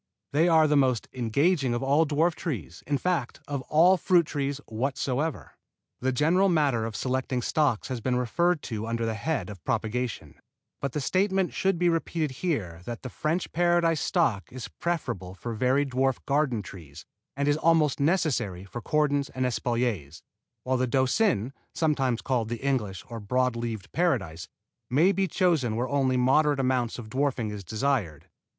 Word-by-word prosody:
They 160 +4 +4
are 160 -2 +5
the 150 - +2
most 130 -5 +2
engaging 130 +3 +1
of 120 - -2
all 145 +4 +3
dwarf 160 +4 +2
trees, 125 - -5
in 145 0 +1
fact 170 -7 -1
of 140 -2 -3
all 175 +5 +5
fruit 180 -2 +3
trees 140 -2 -2
whatsoever. 135 +5 -2 0.5
The 130 +1 0
general 165 +9 +3
matter 140 -9 +2
of 115 -2 -5
selecting 130 0 -1
stocks 145 -8 +1
has 125 -3 -3
been 125 +2 0
referred 170 +7 +1
to 110 -2 -4
under 115 0 -1
the 115 - -1
head 155 +7 -2
of 100 -5 -10
propagation, 115 +1 -3 0.4
but 140 -2 -2
the 150 - -2
statement 190 +4 +1
should 190 -2 +1
be 175 +1 +2
repeated 165 -4 -1
here 100 - -2
that 120 -1 -6
the 125 - -6
French 160 +4 -2
Paradise 175 -1 +2
stock 120 - 0
is 130 -2 -7
preferable 95 - -3
for 115 +4 -5
very 130 +5 +2
dwarf 135 0 0
garden 140 -6 +1
trees, 80 -7 -11 0.3
and 140 0 0
is 145 0 +3
almost 160 -3 +3
necessary 140 - 0
for 120 +5 -7
cordons 145 0 +1
and 130 0 -2
espaliers, 115 - -2 0.4
while 130 0 0
the 130 0 +1
Doucin 130 - +1 0.2
(sometimes 135 -7 +1
called 120 -4 0
the 120 +3 -5
English 105 -9 -1
or 115 -1 -6
broad 125 +4 0
leaved 115 -3 -5
Paradise) 120 - -1 0.4
may 155 +9 +4
be 195 -1 0
chosen 165 - +1
where 120 +3 -1
only 135 -2 +1
a - - +2
moderate 145 +3 +3
amount 130 -3 0
of 120 -3 -8
dwarfing 130 -5 0
is 105 -1 -6
desired. 110 - -1
130 Hz, 170 wpm, -27 LUFS, 115-155 Hz, 0.5 s, are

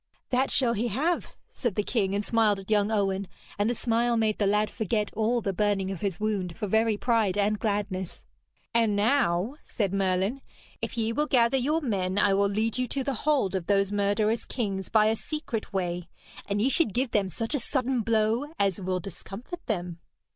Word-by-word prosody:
'That 260 +1 +2
shall 245 -4 +3
he 235 +2 -1
have,' 300 - -1 0.2
said 240 -7 -2
the 210 - +1
king, 200 -4 0
and 205 0 -1
smiled 220 -3 +3
at 195 +2 -9
young 210 0 +3
Owen, 195 -2 0 0.3
and 205 +2 +2
the 240 - 0
smile 235 +1 +1
made 220 -1 +1
the 205 - +2
lad 210 +1 +2
forget 210 -1 -2
all 225 +3 +1
the 195 -2 -1
burning 195 -1 0
of 190 - -6
his 195 -5 -2
wound 200 -5 -2
for - - -2
very 220 +1 +2
pride 220 -5 +1
and 210 +1 +1
gladness. 200 -4 -2 0.5
'And 225 -3 +3
now,' 220 0 +2
said 200 -4 -2
Merlin, 195 +6 0 0.4
'if - - -4
ye 225 0 0
will 300 +5 0
gather 240 -1 +3
your 300 +6 +1
men 195 -8 -1
I 205 -1 +4
will 200 +1 +3
lead 220 +4 -1
you 250 - 0
to 270 +3 -2
the 275 - -1
hold 270 -6 +1
of 185 -3 -2
those 195 -1 +2
murderous 205 +2 +1
kings 200 -6 -3
by 215 -1 +4
a 220 +1 +3
secret 275 -4 -5
way, 180 -3 -2 0.4
and 200 +1 0
ye 260 - +3
should 275 - +2
give 250 0 0
them 200 -3 +1
such 225 - -4
a 290 - +2
sudden 255 0 0
blow 225 +3 +1
as 195 -1 +1
will 185 0 -1
discomfit 200 - -8
them.' 175 -5 -3
215 Hz, 200 wpm, -27 LUFS, 195-235 Hz, 0.5 s, I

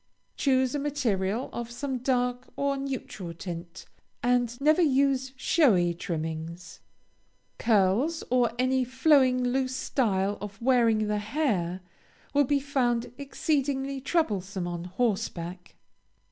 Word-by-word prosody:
Choose 260 -2 +2
a 290 - -1
material 245 -6 -1
of 235 -1 -4
some 260 +2 -4
dark 250 0 0
or 280 0 0
neutral 260 -10 -5
tint, 170 0 -7 0.4
and 245 0 +1
never 305 +5 +4
use 270 -3 +2
showy 220 - +3
trimmings. 165 0 -5 0.8
Curls, 225 - +2
or 250 -2 +3
any 255 +1 +2
flowing 260 0 +3
loose 255 +1 0
style 205 -7 0
of 200 -1 -7
wearing 230 -3 +3
the 210 0 0
hair, 205 - -1 0.5
will 285 0 +4
be 285 +2 +2
found 250 -4 0
exceedingly 275 -1 -1
troublesome 205 - -1
on 175 0 -4
horseback. 185 -4 -3
245 Hz, 115 wpm, -27 LUFS, 195-270 Hz, 0.8 s, never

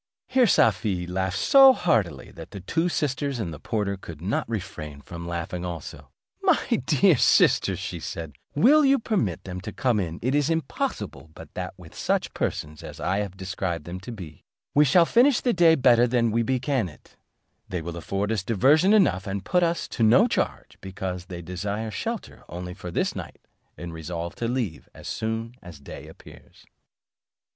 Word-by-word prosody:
Here 255 -2 +3
Safie 95 - +2
laughed 95 +1 -2
so 270 - +7
heartily, 105 - 0
that - - -11
the 100 - -8
two 165 - 0
sisters 140 -4 -1
and 90 -8 -3
the 75 - -9
porter 100 -3 -2
could 85 -5 -10
not 95 +7 -2
refrain 75 -9 -5
from 85 +3 -8
laughing 85 +1 -4
also. 85 -3 -7 0.3
"My - - +4 0.3
dear - - +4
sisters," - - +4 0.2
said 80 -3 -6 0.2
she, - - -2
"you - - +1 0.2
will 275 -2 +5
permit 195 - -1
them 90 -1 -6
to - - -6
come 125 -6 +1
in; 85 -3 -3
it 130 +3 +1
is 145 +1 +2
impossible 160 - -3
but - - -12
that - - -5
with - - -14
such - - -1
persons 75 0 -3
as - - -9
I 95 +3 0
have 100 -2 -4
described 95 -4 -3
them 90 +2 -6
to 95 +6 -8
be, 90 -9 -10 0.3
we 150 +1 +5
shall 170 +5 +5
finish 245 +7 +4
the 245 - +1
day 170 -2 +5
better 125 -3 +5
than 115 -2 +1
we 115 +2 +1
began 130 -3 0
it; 75 - -19 0.5
they 90 -3 -3
will 85 +1 -5
afford 100 +5 -2
us 110 -4 0
diversion 140 - +4
enough, 140 - +3
and 100 0 -4
put 180 - +2
us 170 0 0
to - - -5
no 120 - +6
charge, - - -3
because 95 -2 -5
they 85 -3 -7
desire 100 +5 -4
shelter - - -5
only 90 +1 -6
for 90 -1 -8
this - - -1
night, - - -9 0.3
and 85 -1 -7
resolve 85 +1 -5
to 115 - -2
leave 115 -9 -2
us - - -28
as - - -10
soon 115 +1 -3
as 90 -5 -11
day 70 - -10
appears." - - -16
100 Hz, 185 wpm, -25 LUFS, 90-135 Hz, 0.5 s, so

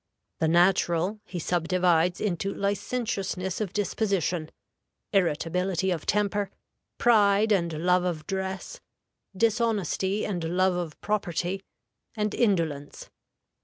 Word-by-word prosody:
The 160 - +2
natural 175 +3 +3
he 180 - -7
subdivides 175 0 +2
into 195 -1 -1
licentiousness 200 -2 -2
of 200 -4 -2
disposition, 190 -5 -1 0.6
irritability 180 +1 +1
of 165 -4 -3
temper, 205 -1 +1 0.5
pride 215 -2 +4
and 170 -4 +2
love 180 0 +4
of 165 -4 -2
dress, 190 - -4 0.6
dishonesty 210 -3 +1
and 180 -5 -2
love 180 +3 +2
of 175 -4 -4
property, 190 -2 -1 0.5
and 210 -1 -1
indolence. 165 -10 -1
190 Hz, 100 wpm, -27 LUFS, 175-205 Hz, 0.6 s, pride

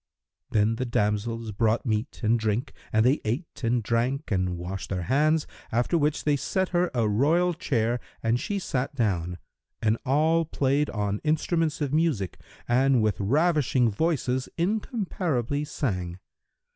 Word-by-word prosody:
Then 110 +1 +2
the 130 - -1
damsels 110 +1 -1
brought 110 +5 +1
meat 110 +1 -2
and 115 +2 +3
drink 110 +5 -1 0.2
and 110 +1 +3
they 135 +4 +3
ate 130 +8 -4
and 120 0 +1
drank 120 +6 -1
and 90 -2 0
washed 90 +2 -5
their 90 -2 -2
hands, 150 - +2 0.3
after 120 +9 +1
which 150 -2 +1
they 150 -1 +3
set 190 +6 -1
her 175 0 +1
a 115 -3 +2
royal 160 +12 +3
chair 120 -6 0 0.2
and 115 +2 +2
she 205 - -2
sat 135 -7 -2
down; 90 -8 0 0.4
and 110 0 +1
all 155 +5 +3
played 145 -1 0
on 105 -1 -2
instruments 160 0 0
of 145 -1 -1
music 150 - 0 0.3
and 130 0 +3
with 105 -4 0
ravishing 130 - +2
voices 130 -1 0
incomparably 175 - -1
sang. 90 - -3
125 Hz, 145 wpm, -26 LUFS, 110-155 Hz, 0.4 s, and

